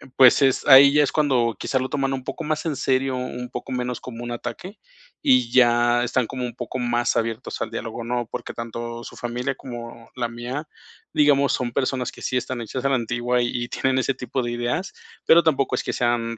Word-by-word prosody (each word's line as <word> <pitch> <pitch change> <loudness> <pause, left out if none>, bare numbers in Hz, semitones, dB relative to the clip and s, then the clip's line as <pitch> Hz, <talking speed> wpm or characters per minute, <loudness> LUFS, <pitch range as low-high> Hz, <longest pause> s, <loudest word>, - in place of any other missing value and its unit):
pues, 130 +2 +7
es 135 -2 +2
ahí 140 +1 +9
ya 150 0 +5
es - - 0
cuando 130 -6 +2
quizás 130 -1 -1
lo 130 - -3
toman 135 -1 -1
un 130 -1 -4
poco 165 - -5
más 155 +1 -2
en 155 -3 -1
serio, 130 0 0
un 125 -1 -5
poco 130 - -7
menos 125 0 -2
como 120 -1 -8
un 120 - -5
ataque, 185 - -7 0.5
y 125 -2 +4
ya 120 -1 +4
están 125 -1 0
como 130 0 -4
un 120 - -6
poco 130 +1 -5
más 120 0 0
abiertos 115 -1 -3
al 110 - -3
diálogo, 115 0 -5
¿no? 120 -1 -2
Porque - - -5
tanto 115 0 -6
su - - -10
familia 125 +2 -3
como 115 -2 -9
la 120 - 0
mía, 125 +6 -5 0.5
digamos, 140 -2 +4
son 125 -2 -1
personas 130 0 -1
que - - -14
sí 130 - -2
están 125 0 -3
hechas 125 +3 -5
a - - +3
la 135 - +3
antigua 125 +1 0
y 120 0 -2
tienen 130 0 0
ese 135 - 0
tipo 125 0 -3
de 120 - -3
ideas, 120 +12 -2 0.3
pero 170 +1 +7
tampoco 140 -5 +1
es - - -2
que - - -3
sean 115 -1 0
125 Hz, 215 wpm, -23 LUFS, 120-135 Hz, 0.5 s, ahí